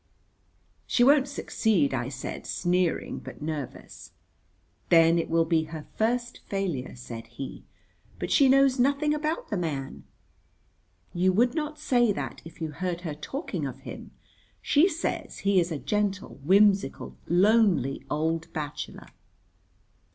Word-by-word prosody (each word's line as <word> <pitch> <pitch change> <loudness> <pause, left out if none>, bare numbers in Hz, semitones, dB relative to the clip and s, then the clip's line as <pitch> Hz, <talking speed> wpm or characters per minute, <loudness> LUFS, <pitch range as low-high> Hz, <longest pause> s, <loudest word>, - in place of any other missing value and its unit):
"She 245 - +3
won't 280 +1 +5
succeed," 220 - +1
I 125 0 -2
said, 135 -1 -6
sneering 180 -1 0
but - - -10
nervous. 150 -3 -6 0.8
"Then 165 0 +6
it - - -3
will 165 0 +3
be 160 -1 +1
her 155 -1 -8
first 240 +2 -1
failure," 180 -10 -3
said 115 -2 -8
he. 120 +3 -8 0.5
"But - - -4
she 275 -3 +5
knows 270 -1 +4
nothing 285 +4 +2
about 305 +2 -2
the 205 - 0
man." 145 -6 -4 1.1
"You 185 +2 +3
would 240 +5 +3
not 305 -1 -3
say 240 -4 +2
that 135 -8 -5
if 165 - -13
you 160 -2 -3
heard 175 +2 -3
her 165 -4 -4
talking 265 - -4
of - - -8
him. - - -9 0.5
She 315 +6 +4
says 330 0 -3
he 200 -1 +4
is 170 0 0
a 155 - -2
gentle, 200 0 -2
whimsical, 200 +4 +3
lonely 185 - +3
old 160 +2 -1
bachelor." 150 -2 -6
180 Hz, 135 wpm, -27 LUFS, 155-240 Hz, 1.1 s, Then